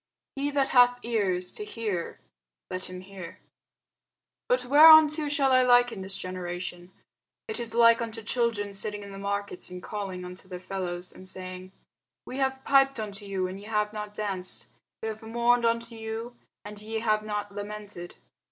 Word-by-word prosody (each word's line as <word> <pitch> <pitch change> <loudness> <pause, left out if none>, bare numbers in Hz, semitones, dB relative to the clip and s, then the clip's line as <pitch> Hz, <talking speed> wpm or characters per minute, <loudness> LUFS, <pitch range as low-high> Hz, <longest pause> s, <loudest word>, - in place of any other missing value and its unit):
He 280 +1 -1
that 280 -2 +1
hath 245 -1 +6
ears 190 -6 -1
to 425 - -5
hear, 215 - -4 0.5
let 185 0 -4
him 185 0 -8
hear. 185 -3 -10 1.1
But 250 0 +2
whereunto 305 +2 +8
shall 280 -2 +3
I 255 0 +6
liken 245 -4 +4
this 190 +1 -3
generation? 180 -1 -5 0.6
It 440 - -4
is 230 -1 -5
like 230 0 +6
unto 225 -1 -5
children 215 -3 0
sitting 205 +1 -3
in 200 - -9
the 195 - -8
markets, 200 -2 -3
and 180 0 -8
calling 190 -3 -5
unto 180 +1 -10
their 180 -1 -7
fellows, 180 -1 -4
and 185 0 -12
saying, 185 0 -8 0.5
We 255 - -6
have 265 -1 0
piped 270 -2 +4
unto 205 -1 -5
you, 190 -2 -1
and 185 +1 -5
ye 205 - -11
have 210 -1 0
not 210 -1 -6
danced; 195 -4 -4 0.4
we - - -1
have 220 0 -5
mourned 235 +1 +2
unto 230 0 0
you, 225 +2 -6 0.3
and 205 0 -8
ye 220 +1 -4
have 215 -2 +2
not 210 -1 -4
lamented. 205 -3 -7
210 Hz, 170 wpm, -28 LUFS, 190-235 Hz, 1.1 s, whereunto